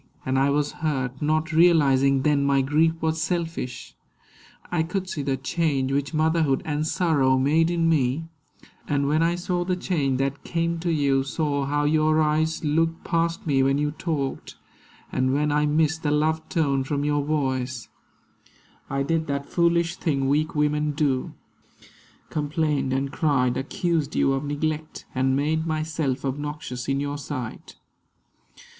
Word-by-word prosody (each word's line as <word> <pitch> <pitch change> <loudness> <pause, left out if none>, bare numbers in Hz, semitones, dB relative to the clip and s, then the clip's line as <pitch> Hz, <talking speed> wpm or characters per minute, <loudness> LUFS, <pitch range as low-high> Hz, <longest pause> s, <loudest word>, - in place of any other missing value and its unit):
And 130 0 +1
I 135 +1 +3
was 145 +1 +1
hurt, 135 -4 -3
not 155 +2 0
realising 140 -5 +4
then 145 -1 +2
My 140 -1 +3
grief 155 +4 +2
was 160 0 0
selfish. 165 -6 -3 0.8
I 175 -2 +1
could 185 +3 -2
see 155 - -4
the 135 -1 -1
change 135 -1 0
Which 140 -1 -1
motherhood 155 -3 +1
and 150 0 -1
sorrow 150 -8 +2
made 155 +5 +3
in 170 -1 +1
me; 150 -1 +1 0.6
And 140 -1 +1
when 155 +2 +2
I 170 +1 +2
saw 175 0 -1
the 180 +1 0
change 150 -8 0
that 135 +1 -2
came 170 0 -1
to 170 0 -1
you, 140 -4 +2
Saw 140 0 -1
how 145 +1 0
your 155 +1 +3
eyes 155 +1 +1
looked 165 +2 0
past 170 0 -1
me 140 -4 +2
when 135 +1 +2
you 145 0 0
talked, 150 -3 -4 0.6
And 130 0 +1
when 150 +1 +1
I 150 0 +2
missed 155 +1 +1
the 150 - 0
love 155 +2 0
tone 140 -5 +1
from 145 +1 -2
your 145 -1 +1
voice, 130 -5 -2 1.0
I 140 0 0
did 160 +2 -1
that 140 0 -2
foolish 170 +1 +1
thing 135 -4 0
weak 155 +4 +1
women 150 0 +1
do, 140 -3 -1 1.0
Complained 150 -2 -1
and 135 +1 -1
cried, 140 -6 +1
accused 155 +1 -1
you 135 - +3
of 135 +2 -2
neglect, 155 +2 -3
And 130 0 +1
made 160 +3 0
myself 155 -4 -2
obnoxious 140 -2 -4
in 135 0 0
your 145 0 -3
sight. 130 -5 -6
150 Hz, 155 wpm, -24 LUFS, 135-160 Hz, 1.0 s, realising